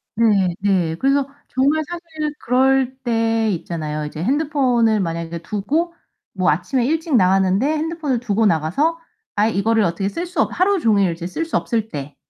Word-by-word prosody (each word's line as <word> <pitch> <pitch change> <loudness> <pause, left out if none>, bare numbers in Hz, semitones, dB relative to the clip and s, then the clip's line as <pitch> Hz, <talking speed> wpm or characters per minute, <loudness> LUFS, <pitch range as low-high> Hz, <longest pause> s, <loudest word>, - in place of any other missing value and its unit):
네네. 195 -5 +2
그래서 275 0 +2 0.2
정말 280 +4 +1
사실 325 -4 -5
그럴 260 +1 +2
때 225 -2 +1
있잖아요. 155 -4 -4
이제 150 +1 -6
핸드폰을 255 - +2
만약에 170 -2 -3
두고 290 - -1 0.4
뭐 - - +1
아침에 260 -4 0
일찍 320 +1 0
나갔는데 190 +2 +3
핸드폰을 310 -3 -1
두고 225 -2 0
나가서 200 - +1 0.4
아예 210 +2 +2
이거를 220 +2 +2
어떻게 190 +2 -1
쓸 335 - -4
수 360 +1 -1
없 - - +1
하루 390 +2 +2
종일 205 - +3
이제 170 +1 -6
쓸 320 - -3
수 325 - -4
없을 225 -3 -1
때 145 -4 -7
225 Hz, 330 characters per minute, -20 LUFS, 185-290 Hz, 0.4 s, 나갔는데